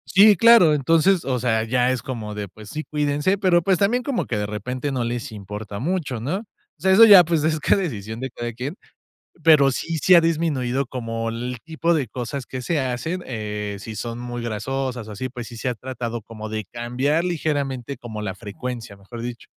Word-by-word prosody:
Sí, 205 +2 +8
claro, 230 -9 +7
entonces 165 +6 +3
O 130 -2 0
sea, 115 -2 +1
ya 125 +2 +1
es 130 - -2
como 110 -5 -5
de, 105 -1 -4
pues 105 +3 -13
sí, 155 0 -4
cuídense, 150 +6 0
pero 175 -3 +3
pues, 190 0 +2
también 240 +5 +2
como 275 -4 -2
que 110 - -2
de 105 - -1
repente 125 +7 -4
no 125 -3 -1
les 120 -1 -3
importa 105 0 -7
mucho, 150 -5 -2
¿no? 145 - -2
O 230 - -15 0.3
sea, 190 - +2
eso 210 +4 +8
ya, 200 -5 +10
pues, 165 -2 0
es 155 0 +1
ca - - +3
decisión 110 - -4
de 130 +1 -4
cada 120 -1 -5
quien, 130 +8 -5 0.7
pero, 150 -4 +6
sí 165 +5 -3
sí 185 +6 +3
ha 170 - +8
disminuido 145 -6 0
como 115 -2 -4
el 120 +2 -4
tipo 165 +1 0
de 140 -7 0
cosas 125 +4 -5
que 130 -1 -6
se 160 +2 0
hacen, 130 +8 -2
eh, 105 -3 -4
si 110 +3 -8
son 115 +2 -5
muy 120 0 -5
grasosas 120 +2 -3
o 110 - -8
así, 130 +5 -4
pues, 120 -2 -7
sí 120 - -10
se 130 - -3
ha 125 - -1
tratado 120 -2 -5
como 110 0 -8
de 110 0 -4
cambiar 125 - -1
ligeramente 140 -6 -2
como 110 -3 -7
la 100 -2 -3
frecuencia, 115 +1 -7
mejor 110 +4 -9
dicho. 120 0 -6
125 Hz, 210 wpm, -23 LUFS, 115-155 Hz, 0.7 s, ya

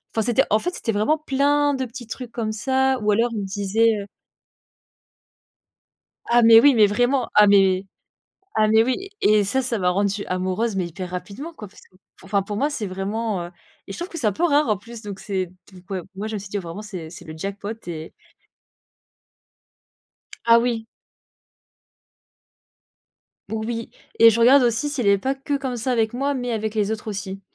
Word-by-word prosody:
Enfin, 225 - +2
c'était, 245 +3 +3
en 215 - +3
fait, 355 +7 -3
c'était 225 - -2
vraiment 215 +10 +2
plein 290 0 +1
de 265 - -2
petits 240 0 -10
trucs 245 0 -7
comme 220 -2 -3
ça 265 +3 +1
ou 210 0 +2
alors 230 +4 +2
il 210 - -2
me - - -4
disait, 205 +3 +1
heu 200 - -7 2.2
Ah, 240 0 +5
mais 225 0 +9
oui, 280 0 +6
mais 215 -2 +6
vraiment. 245 +4 +1
Ah 210 0 +7
mais 195 -1 +4 0.7
ah 215 0 +3
mais, 220 +1 +5
oui 260 +11 -2
et 210 -1 +4
ça 265 +7 0
ça 245 -3 -2
m'a 180 -1 +2
rendu 200 +1 -1
amoureuse 185 +4 -1
mais 185 -2 0
hyper 180 +1 -7
rapidement, 205 - -7
quoi. 210 -9 -10
Parce - - -18 0.4
qu'enfin, 200 +1 -1
pour 205 +1 -5
moi, 285 +6 +1
c'est 230 -8 -4
vraiment, 195 0 -3
heu 175 - -10 0.4
et - - -7
je - - -8
trouve 345 +2 -5
que 335 - -8
c'est 235 -8 0
un 205 - +1
peu 270 - -3
rare 300 -4 +3
en 210 -3 +1
plus, 230 +2 -11
donc 205 -3 -7
c'est 190 -3 -2 0.2
donc, 185 +1 -16
ouais, 190 -2 -3
moi, 205 +3 -4
je 220 - -4
me 205 - -3
suis 195 - -10
dit: 205 - -3
«Vraiment, 180 +1 -6
c'est 185 -7 -8
c'est 175 +1 -12
le 155 - -9
jackpot» 200 +4 -5 0.2
et 160 -2 -6 2.3
Ah 230 0 +7
oui! 230 -2 -1 2.6
Oui 225 +1 -4 0.3
et 230 - +9
je 230 +1 0
regarde 255 +3 +6
aussi 240 +5 +1
s'il 270 -7 -2
est 200 0 +5
pas 265 +7 -1
que 280 +1 -2
comme 265 -2 -4
ça 240 +2 -2
avec 225 -1 +1
moi 280 +3 -1
mais 245 -2 -3
avec 220 -1 -3
les 210 0 +1
autres 220 0 -5
aussi. 195 -1 -5
220 Hz, 195 wpm, -22 LUFS, 200-245 Hz, 2.6 s, mais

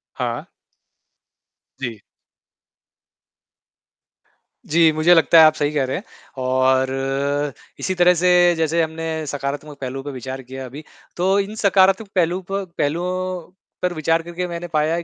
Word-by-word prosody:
हाँ। - - -4 1.3
जी। 115 -6 -5 2.7
जी, 165 0 +5
मुझे 155 +3 +4
लगता 165 0 +6
है, 160 - +9
आप 155 - +6
सही 145 -1 -1
कह 145 -3 +1
रहे 130 - -2
हैं, 200 - -7 0.3
और 135 +2 0 0.3
इसी 185 - -2
तरह 180 0 +5
से, 180 +2 +2 0.3
जैसे 165 +1 +1
हमने 160 0 -3
सकारात्मक 145 +1 -5
पहलू 135 +1 -4
पे 145 - -5
विचार 130 0 -6
किया 130 +1 -8
अभी, 140 +5 -9 0.3
तो 190 +3 +2
इन 200 +2 -3
सकारात्मक 195 0 +3
पहलू 180 +1 +1
प 195 - 0 0.2
पहलुओं 180 +3 -2 0.3
पर 180 -1 0
विचार 165 +1 +1
करके 175 +1 -4
मैंने 175 0 -5
पाया 155 +2 +2
है 170 - -3
160 Hz, 140 wpm, -21 LUFS, 135-175 Hz, 2.7 s, है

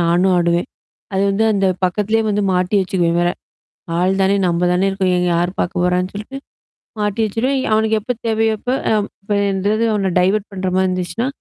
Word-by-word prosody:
நானும் 175 +2 +3
ஆடுவேன். 170 0 +1 0.5
அது 190 - +1
வந்து 200 +3 +1
அந்த 195 -1 +1 0.2
பக்கத்திலேயே 210 +4 0
வந்து 210 0 0
மாட்டி 180 +2 0
வச்சுக்குவேன் 175 -2 0
வேற. 175 - +2 0.7
ஆள் 185 +2 +2
தானே 195 +1 +3
நம்ப 175 0 0
தானே 185 +2 +1
இருக்கோம். 190 -1 0
இங்க 180 0 +1
யார் 175 +1 0
பார்க்க 175 0 -1
போறான்னு 180 +1 0
சொல்லிட்டு. 215 +7 -7 0.6
மாட்டி 210 +2 -1
வச்சுருவேன் 255 +6 -1
அவனக்கு 220 0 +2
எப்ப 240 - -3 0.2
தேவையோப்போ 225 +2 0 0.2
அ - - +4 0.3
இப்பந்தாவது 200 +1 0
அவன 195 -3 0
டைவர்ட் 195 +3 +1
பண்ற 190 -1 -3
மாரி 190 0 +2
இருந்துச்சுன்னா. 185 +7 -2
195 Hz, 170 wpm, -18 LUFS, 180-215 Hz, 0.7 s, அ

